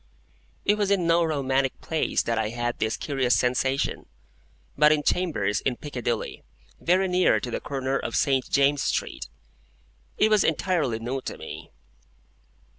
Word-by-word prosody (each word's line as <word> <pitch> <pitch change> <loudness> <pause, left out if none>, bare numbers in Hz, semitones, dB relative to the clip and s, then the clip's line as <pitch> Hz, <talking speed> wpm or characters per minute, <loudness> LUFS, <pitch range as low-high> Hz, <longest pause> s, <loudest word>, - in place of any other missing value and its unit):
It 205 +1 +2
was 205 -2 +1
in 195 -4 +2
no 170 +1 +4
romantic 135 -4 0
place 160 -1 -1
that 115 -1 -1
I 110 -1 0
had 120 +1 -3
this 110 0 0
curious 135 -4 +1
sensation, 130 +2 0 0.7
but 150 +1 +5
in 150 -1 +2
chambers 145 - 0
in 130 - 0
Piccadilly, 120 -5 -4 0.4
very 185 +3 +2
near 180 0 +3
to 125 - -5
the - - -2
corner 135 -1 -2
of - - -4
St. 135 -2 +1
James's 140 0 +2
Street. - - -3 0.9
It 215 - +4
was 210 -2 +5
entirely 160 -7 0
new 125 +4 -4
to - - -6
me. 80 0 -9
135 Hz, 150 wpm, -25 LUFS, 120-165 Hz, 0.9 s, but